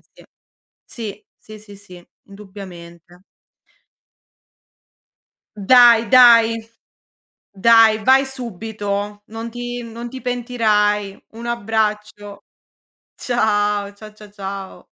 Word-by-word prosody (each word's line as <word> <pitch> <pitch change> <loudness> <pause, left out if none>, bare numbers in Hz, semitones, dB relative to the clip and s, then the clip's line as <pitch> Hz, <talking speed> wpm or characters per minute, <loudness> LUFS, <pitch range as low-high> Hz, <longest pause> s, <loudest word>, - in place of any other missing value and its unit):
sì. - - -19 0.6
Sì, 210 -3 -9
sì, 215 0 -14
sì, 205 -1 -15
sì, 180 -3 -16 0.2
indubbiamente. 180 -3 -13 2.3
Dai, 235 +1 +5
dai 230 -3 +5 0.9
dai, 220 +1 +4
vai 265 +2 +4
subito. 210 -4 -6
Non 225 +1 -7
ti 245 0 -6
non 235 +1 -8
ti 260 +1 -10
pentirai. 215 -5 -1
Un 230 +1 -10
abbraccio. 210 -3 -3 0.7
Ciao, 205 -4 -1
cia 215 +1 -13
cia 210 -1 -16
ciao. 195 -1 -8
215 Hz, 90 wpm, -19 LUFS, 200-235 Hz, 2.3 s, Dai